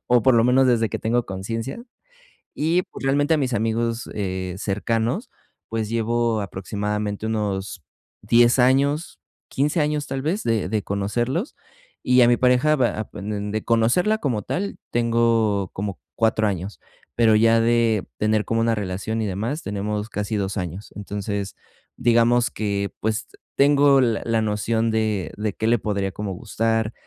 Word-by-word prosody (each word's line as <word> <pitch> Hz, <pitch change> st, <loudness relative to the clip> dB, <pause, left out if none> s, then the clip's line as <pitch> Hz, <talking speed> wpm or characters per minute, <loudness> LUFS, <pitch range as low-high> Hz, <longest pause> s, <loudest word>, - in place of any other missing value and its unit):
o, 120 Hz, -1 st, +4 dB
por 130 Hz, 0 st, +5 dB
lo 115 Hz, -, +4 dB
menos 130 Hz, +2 st, +4 dB
desde 115 Hz, -3 st, +2 dB
que -, -, -4 dB
tengo 120 Hz, +2 st, 0 dB
conciencia. 115 Hz, -, -5 dB, 0.7 s
Y 165 Hz, +4 st, +1 dB
pues, -, -, -9 dB
realmente 145 Hz, +3 st, +2 dB
a -, -, +1 dB
mis 130 Hz, -4 st, -1 dB
amigos, 115 Hz, +1 st, -1 dB
eh, 95 Hz, -2 st, -3 dB
cercanos, 115 Hz, -, -1 dB, 0.4 s
pues, 110 Hz, -1 st, -2 dB
llevo 115 Hz, -1 st, 0 dB
aproximadamente 105 Hz, +2 st, -3 dB
unos 100 Hz, -5 st, -3 dB, 0.4 s
10 120 Hz, +4 st, +4 dB
años, 140 Hz, +5 st, +2 dB, 0.3 s
15 145 Hz, +4 st, 0 dB
años, 150 Hz, -1 st, 0 dB
tal 135 Hz, 0 st, -3 dB
vez, 170 Hz, +9 st, -1 dB
de 110 Hz, -5 st, 0 dB
de 105 Hz, -1 st, -1 dB
conocerlos, 120 Hz, -, -2 dB, 0.5 s
y 125 Hz, 0 st, +4 dB
a 120 Hz, -, +6 dB
mi 120 Hz, -, +4 dB
pareja 125 Hz, +5 st, +3 dB
van 105 Hz, -4 st, -2 dB
de 110 Hz, +1 st, -3 dB
conocerla 120 Hz, -, +2 dB
como 120 Hz, -, -1 dB
tal, 200 Hz, -, -3 dB
tengo 115 Hz, -4 st, +1 dB
como 100 Hz, -7 st, -4 dB
4 110 Hz, -1 st, +2 dB
años, 100 Hz, 0 st, -4 dB, 0.4 s
pero 115 Hz, -2 st, +4 dB
ya 115 Hz, +1 st, +4 dB
de 115 Hz, -2 st, +2 dB
tener 110 Hz, 0 st, +1 dB
como 115 Hz, 0 st, 0 dB
una 115 Hz, 0 st, +2 dB
relación 100 Hz, +3 st, -3 dB
y 110 Hz, -, -1 dB
demás 110 Hz, -, -3 dB
tenemos 105 Hz, +1 st, -3 dB
casi 105 Hz, -1 st, -3 dB
2 100 Hz, 0 st, -2 dB
años. 90 Hz, +2 st, -5 dB
Entonces, 100 Hz, -1 st, -4 dB, 0.4 s
digamos 120 Hz, +1 st, +3 dB
que, 100 Hz, -2 st, -2 dB
pues, 110 Hz, +1 st, -1 dB, 0.3 s
tengo 140 Hz, -1 st, +5 dB
la 115 Hz, -3 st, +1 dB
la 115 Hz, -1 st, +1 dB
noción 110 Hz, +2 st, 0 dB
de 110 Hz, -4 st, -1 dB
de 105 Hz, 0 st, -2 dB
qué 110 Hz, -, -2 dB
le 120 Hz, +1 st, +3 dB
podría 100 Hz, -2 st, -2 dB
como 100 Hz, -2 st, -4 dB
gustar, 115 Hz, +4 st, -1 dB
115 Hz, 155 wpm, -23 LUFS, 105-120 Hz, 0.7 s, a